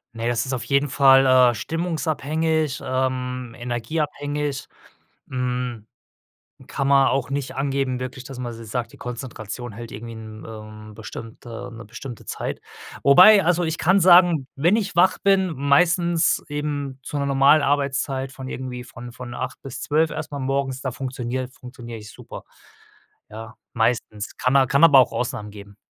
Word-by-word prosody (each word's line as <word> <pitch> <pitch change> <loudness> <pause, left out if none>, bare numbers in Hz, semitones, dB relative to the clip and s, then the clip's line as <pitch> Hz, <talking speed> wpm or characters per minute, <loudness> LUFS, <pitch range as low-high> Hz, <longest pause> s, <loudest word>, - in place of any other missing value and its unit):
Ne 115 +1 -3
das 120 -1 0
ist 130 - -3
auf 125 -2 -3
jeden 140 +4 +1
Fall, 135 0 +6 0.3
äh, - - -5
stimmungsabhängig, 160 0 -1
ähm, 125 -1 -2
energieabhängig. 145 +3 -3 0.6
Hm, 125 -3 -3 0.8
kann 135 - -2
man 135 -1 +5
auch 135 0 -1
nicht 140 -1 -3
angeben 135 -2 -1
wirklich, 130 0 -6
dass 135 -1 -9
man 120 -2 -5
so 115 0 -10
sagt: 115 +1 -4
„Die - - -14
Konzentration 120 -1 -7
hält 115 +2 -9
irgendwie 115 +2 -8
'n 110 -1 -10
ähm, 110 -1 -10
bestimmte 115 +2 -9
'ne 115 0 -9
bestimmte 115 +3 -9
Zeit.“ - - -5 0.4
Wobei 185 +9 +8
also 175 +1 +2
ich 160 -1 -2
kann 185 +4 +4
sagen: 175 -5 +6
Wenn 170 +9 +3
ich 200 -5 -2
wach 185 +2 +4
bin, 195 -2 +3
meistens 165 +4 +2
eben 145 -2 -4
zu 145 - -5
'ner 140 - 0
normal 140 +2 +4
Arbeitszeit 135 -1 0
von 130 -1 -9
irgendwie 125 -2 -6
von 120 0 -10
von 125 0 -9
8:00 - - -5
bis 135 -2 -7
12:00 155 +2 +1
erst 155 -1 -5
mal 145 - -4
morgens, 135 0 -2
da 130 - -3
funktioniere 130 0 -4
funktioniere 125 -2 -10
ich 105 -1 -11
super. - - -10 0.9
Ja, 115 +2 -9 0.2
meistens. 110 -2 -1
Kann 130 +2 +1
a 135 -1 +4
kann 140 +5 +2
aber 145 -5 +8
auch 125 - +4
Ausnahmen 105 -4 -3
geben. 100 -1 -12
130 Hz, 160 wpm, -23 LUFS, 120-145 Hz, 0.9 s, Wobei